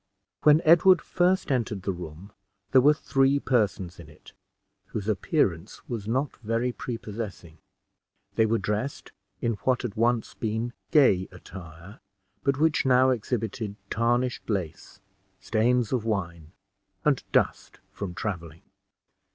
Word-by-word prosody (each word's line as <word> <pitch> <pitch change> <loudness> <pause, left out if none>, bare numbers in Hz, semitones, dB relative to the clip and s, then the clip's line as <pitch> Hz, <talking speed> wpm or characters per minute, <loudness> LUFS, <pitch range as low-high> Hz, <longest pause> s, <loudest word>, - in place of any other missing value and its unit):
When 150 +2 +5
Edward 175 +4 +7
first 180 -2 +1
entered 110 -7 -1
the 100 - 0
room, 90 +2 -9 0.4
there 130 - +7
were 150 +3 +5
three 135 -1 +2
persons 100 -9 0
in 80 -3 -11
it, 75 - -17 0.5
whose 105 -1 -5
appearance 100 - -1
was 110 -5 -5
not 130 +5 -1
very 115 +2 -1
prepossessing. 105 - -7 0.7
They 110 - +3
were 115 +1 +2
dressed 105 +7 -3 0.3
in 115 -2 0
what 130 +4 0
had 120 -5 -3
once 115 +1 +1
been 115 +2 -3 0.2
gay 100 -11 +4
attire, 90 +1 -11 0.4
but 140 -1 +1
which 155 +1 +2
now 130 0 +4
exhibited 110 -3 -3 0.2
tarnished 120 +3 0
lace, 95 -2 -4 0.4
stains 115 +4 +1
of 125 -4 0
wine, 85 -7 -3 0.5
arid 145 -4 +3
dust - - 0
from 95 -4 -6
traveling. 85 -7 -5
110 Hz, 125 wpm, -26 LUFS, 95-130 Hz, 0.7 s, Edward